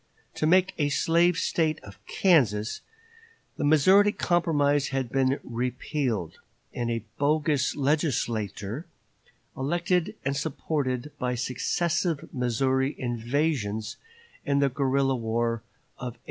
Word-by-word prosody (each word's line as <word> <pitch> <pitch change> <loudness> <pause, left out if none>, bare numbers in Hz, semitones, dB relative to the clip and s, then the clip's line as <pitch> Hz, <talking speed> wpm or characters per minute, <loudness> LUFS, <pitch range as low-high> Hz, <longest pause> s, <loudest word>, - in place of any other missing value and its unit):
To 155 - 0
make 185 +2 +4
a 145 -1 +2
slave 170 +4 +3
State 160 -3 0
of 100 0 -13
Kansas, 120 - +2 0.8
the - - -2
Missouri 185 +8 +5
Compromise 145 -7 +1
had 135 -3 -2
been 135 0 +1
repealed, 125 - -3 0.3
and 120 -1 -2
a 115 -2 -2 0.2
bogus 150 -1 +1
legislature 125 - -1 0.7
elected 175 +5 0
and 140 0 0
supported 140 -2 -2
by 125 0 -1
the - - -3
successive 160 +6 -1
Missouri 130 +2 0
invasions 120 -3 -1 0.5
and 140 0 +1
the 140 -1 +3
guerrilla 135 0 +1
war 115 0 -1 0.4
of 125 -2 -5
1856. - - -29
135 Hz, 115 wpm, -27 LUFS, 120-155 Hz, 0.8 s, Missouri